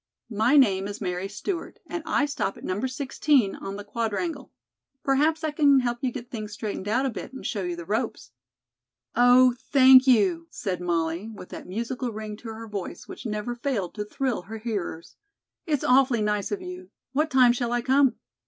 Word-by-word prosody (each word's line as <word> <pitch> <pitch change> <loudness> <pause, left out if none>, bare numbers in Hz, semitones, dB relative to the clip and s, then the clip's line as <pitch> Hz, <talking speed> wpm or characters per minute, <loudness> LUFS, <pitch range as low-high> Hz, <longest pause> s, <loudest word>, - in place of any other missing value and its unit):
"My 225 +7 +3
name 195 -8 +4
is 205 0 -6
Mary 180 -1 -3
Stewart, 335 - -5
and 340 - -4
I 290 - +2
stop 285 -9 -2
at - - -13
No. 185 +5 -2
16 260 -3 +1
on 195 - -6
the 205 - -7
Quadrangle. 230 - -3 0.5
Perhaps 305 +4 +2
I 310 - 0
can 285 -3 +4
help 240 -1 -2
you 255 - 0
get 245 -1 -8
things 215 -3 -6
straightened 210 -2 -5
out 245 +6 +1
a - - +1
bit 245 - -7
and 265 - -9
show 205 - -2
you 175 -1 -3
the 170 -1 -8
ropes." 215 - -3 0.8
"Oh, 245 +1 +6 0.2
thank 260 -1 +8
you," 190 -9 +3
said 180 -3 -4
Molly, 170 +3 -1
with 205 -4 -10
that - - -9
musical 235 +5 -3
ring 215 -1 -6
to 230 - -11
her 225 0 -7
voice 200 -4 -6
which - - -7
never 210 +3 -3
failed 235 -7 -2
to 210 - -3
thrill 245 +1 -2
her 220 +5 -8
hearers. 205 -7 -5 0.5
"It's 295 -4 0
awfully 255 -3 +4
nice 210 -1 -1
of 390 -2 -3
you. 360 0 -8 0.2
What 305 +3 +1
time 255 -4 +5
shall 240 -1 -2
I 240 0 0
come?" 270 +1 +4
235 Hz, 190 wpm, -26 LUFS, 205-265 Hz, 0.8 s, thank